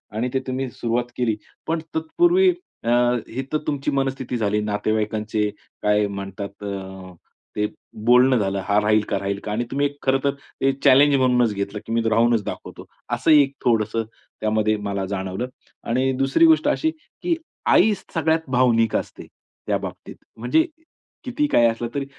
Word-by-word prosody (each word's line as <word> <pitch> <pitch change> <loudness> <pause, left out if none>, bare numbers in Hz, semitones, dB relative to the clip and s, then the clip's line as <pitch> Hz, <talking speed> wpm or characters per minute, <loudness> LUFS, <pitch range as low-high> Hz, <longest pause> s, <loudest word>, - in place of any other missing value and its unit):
आणि 120 +3 -1
ते 135 - +2
तुम्ही 130 0 -2
सुरुवात 120 +1 -2
केली. 120 -3 +1 0.3
पण 165 +1 0 0.2
तत्पूर्वी 345 - +3 0.3
अ, 115 - -1 0.4
ही 130 +3 -4
तर 155 - +2
तुमची 145 -1 -1
मनस्थिती 135 -2 -1
झाली, 105 -2 0
नातेवाईकांचे 105 0 -1 0.3
काय 105 0 +2
म्हणतात, 100 0 -7 0.9
ते 105 - +1 0.4
बोलणं 125 +2 +6
झालं 100 -2 0
हा 105 0 +3
राहील 105 +1 +3
का? - - 0
राहील 100 0 -3
का? 105 - -4
आणि 110 +3 0
तुम्ही 140 +1 +1
खरं 135 0 +2
तर 140 -1 +2 0.3
ते 135 - +4
चॅलेंज 140 +1 +6
म्हणूनच 125 -4 +3
घेतलं 100 +1 -4
की - - -7
मी 115 - +2
राहूनच 115 0 +3
दाखवतो. - - -7 0.3
असं - - +2
एक 140 -3 +5
थोडंसं 115 -1 +1 0.4
त्यामध्ये 110 0 +1
मला 100 -1 -2
जाणवलं 95 +4 -3 0.4
आणि 130 +3 +2
दुसरी 135 - +4
गोष्ट 320 -2 +4
अशी 320 +1 +1
की 335 +2 -4 0.4
आईच 205 -3 +4
सगळ्यात 160 0 +1
भावनिक 120 -3 +3
असते - - -3 0.4
त्या - - +2
बाबतीत. - - -8 0.2
म्हणजे 125 - +2 0.6
किती 270 +4 0
काही 120 - +5
असलं 115 +1 -2
तरी 140 -1 -1
120 Hz, 155 wpm, -22 LUFS, 105-140 Hz, 0.9 s, बोलणं